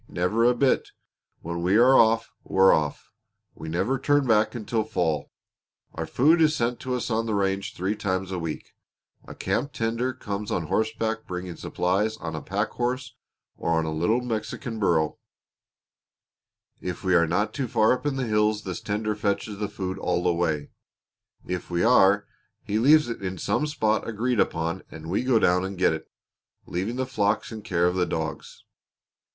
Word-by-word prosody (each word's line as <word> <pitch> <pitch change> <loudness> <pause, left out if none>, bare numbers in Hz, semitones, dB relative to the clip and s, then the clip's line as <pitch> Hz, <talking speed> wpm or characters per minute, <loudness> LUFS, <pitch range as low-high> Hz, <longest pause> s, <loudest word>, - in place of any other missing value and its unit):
Never 100 +7 +1
a 125 0 +4
bit! 130 +2 +2 0.5
When 85 +1 -4
we 90 +4 +3
are 125 +3 +6
off, 115 -1 +4
we're 95 0 +5
off! 75 -2 -2 0.4
We 80 - -8
never 100 +11 0
turn 145 0 +2
back 110 0 +2
until 110 -1 -1
fall. 85 -9 -1 0.6
Our - - -4
food 160 +6 +4
is 155 -1 +4
sent 120 -1 -1
to 130 -1 -2
us 125 -1 -3
on 115 +1 0
the 110 - 0
range 95 0 -1
three 95 +4 -1
times 95 -2 -2
a 90 - -2
week. 80 -2 -5 0.6
A - - -9
camp 140 0 -2
tender 115 +1 -1
comes 105 -4 -5
on 90 - -1
horseback 110 +5 -1
bringing 90 -1 -5
supplies 100 +8 -1
on 80 -1 -6
a 80 - -4
packhorse 120 +5 -2 0.5
or 85 - -1
on 80 - +1
a 80 - -2
little 110 +10 +1
Mexican 115 0 -4
burro. 80 -6 +1 1.6
If 90 +1 -5
we 95 -1 +2
are 85 -2 +4
not 100 +6 0
too 135 -4 -2
far 110 -1 +3
up 125 - -4
in 145 -2 -1
the 135 -1 -1
hills 105 -1 +1
this 95 -2 -5
tender 105 +1 -1
fetches 105 0 -2
the 105 -2 -2
food 95 -1 -4
all 90 -2 0
the 90 - +2
way; 80 -4 -1 0.7
if 90 -1 -4
we 85 -1 0
are, 100 -4 +5 0.4
he 105 +2 -1
leaves 150 +5 +5
it 115 - -5
in 95 -1 -4
some 150 - 0
spot 110 -8 0
agreed 115 +2 -1
upon 85 +1 0
and 80 +1 -8
we 100 - +1
go 130 -2 +3
down 90 -3 +3
and 95 0 -5
get 90 -3 +3
it, 80 - -7 0.6
leaving 95 +7 -3
the 130 0 -1
flocks 105 -5 0
in 110 -1 -6
care 90 -5 0
of 90 - +2
the 90 -1 +1
dogs. - - -5
105 Hz, 180 wpm, -25 LUFS, 90-115 Hz, 1.6 s, are